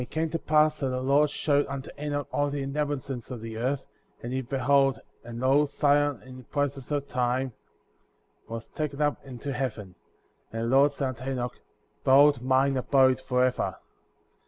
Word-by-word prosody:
And 125 - -5
it - - -28
came 160 0 -1
to 165 - -1
pass 155 0 +3
that 135 - -1
the 130 0 -2
Lord 140 +3 +3
showed 145 0 +1
unto 140 0 -6
Enoch 145 -1 -2
all 145 0 +1
the 140 -1 -3
inhabitants 140 -3 -3
of 125 - -6
the 110 0 -7
earth 130 +4 -1
f - - -33
and 120 +2 -4
he 130 - 0
beheld, 135 +1 +2 0.2
and 120 0 -7
lo, 135 +3 +4
Zion, 145 -2 +1
in 130 0 -11
process 140 -3 -2
of 145 -1 -1
time, 125 0 -1 0.9
was 115 0 -6
taken 150 -2 -4
up 145 -4 0
into 135 +1 -6
heaven. 110 -7 -4 0.6
And 115 0 -3
the 120 +3 +1
Lord 140 +1 +6
said 140 -1 -2
unto 130 +1 -6
Enoch: 125 -2 -2 0.5
Behold 140 0 +6
mine 130 +1 +2
abode 130 0 +3
forever. 125 -1 0
135 Hz, 180 wpm, -27 LUFS, 125-145 Hz, 0.9 s, Lord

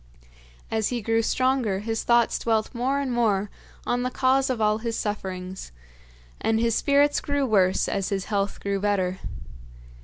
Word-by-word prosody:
As 220 -1 +1
he 245 - -2
grew 225 +1 +1
stronger, 255 -4 +1
his 225 +1 -2
thoughts 235 -1 +3
dwelt 225 0 0
more 260 +3 0
and 275 -2 -2
more 210 -4 +1 0.3
on 245 0 0
the 250 - -1
cause 260 +1 +2
of 255 -3 -1
all 215 0 +2
his 230 0 -3
sufferings, 190 - -5 0.7
and 225 0 +1
his 230 0 +2
spirits 285 +4 +3
grew 285 -1 -1
worse 190 -6 +2
as 195 - -1
his 195 -2 -2
health 200 -1 -1
grew 200 0 -1
better. 190 -2 0
225 Hz, 160 wpm, -25 LUFS, 200-250 Hz, 0.7 s, thoughts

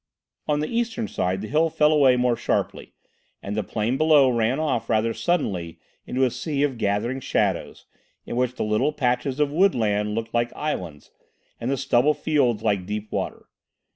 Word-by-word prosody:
On 150 0 +1
the 155 - -1
eastern 230 -1 -2
side 95 - -2
the 110 - -5
hill 155 +5 +2
fell 150 0 +3
away 140 -4 +5
more 125 -1 +2
sharply, - - -2 0.5
and 100 - -4
the 110 - 0
plain 110 +5 -2
below 150 -4 +5
ran 120 +3 +1
off 135 -8 -1
rather 115 0 +1
suddenly 95 - -1 0.3
into 130 +1 0
a 130 - +2
sea 145 0 -2
of 135 -5 -1
gathering 110 +5 -1
shadows - - -1 0.4
in - - -5
which 125 0 0
the - - -2
little 110 +8 +1
patches 125 +1 -1
of 145 -1 +2
woodland 110 - +1
looked 115 0 -4
like 120 0 +1
islands 90 - -5 0.5
and 120 - -3
the 135 - 0
stubble 135 +2 +2
fields 135 -8 +1
like 100 -4 0
deep 105 +1 -5
water. - - -4
125 Hz, 175 wpm, -24 LUFS, 110-150 Hz, 0.5 s, away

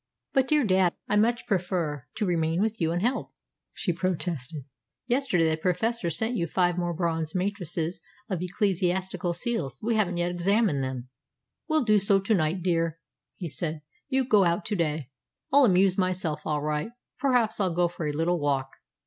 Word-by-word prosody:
"But, 265 -1 +3
dear 300 0 +3
dad, 185 -3 +3
I 210 - +1
much 235 +4 +2
prefer 175 - -1
to 215 - 0
remain 165 -2 +1
with 215 0 0
you 165 0 +2
and 175 +2 -1
help 250 +3 0
you," - - -41 0.4
she 175 - -1
protested. 165 -5 -3 0.4
"Yesterday 245 -10 +2
the 160 0 +1
Professor 185 +4 0
sent 225 +7 0
you 170 -6 0
five 175 +1 +1
more 175 -1 -1
bronze 165 -2 -1
matrices 180 -3 -2 0.3
of 185 -5 -2
ecclesiastical 185 -1 0
seals. 195 - -2
We 230 +1 +1
haven't 180 -5 +1
yet 175 0 0
examined 180 -4 +2
them." 130 -1 -5 0.6
"We'll 310 -3 +2
do 215 -3 +4
so 200 0 +3
to 195 +3 +1
night, 170 -1 +1
dear," 165 -2 +1 0.4
he 175 - -5
said. 155 0 -4 0.3
"You 265 -1 +1
go 210 -5 +5
out 170 +3 +1
to 210 - -1
day. 155 -6 -1 0.4
I'll 285 -1 +7
amuse 190 -2 +4
myself 180 -5 -1
all 150 -1 0
right. 150 +9 -2 0.3
Perhaps 245 -6 +2
I'll 185 -4 +1
go 175 0 +3
for 170 -2 -5
a - - 0
little 165 +4 0
walk." 135 -2 -1
180 Hz, 180 wpm, -27 LUFS, 165-210 Hz, 0.6 s, I'll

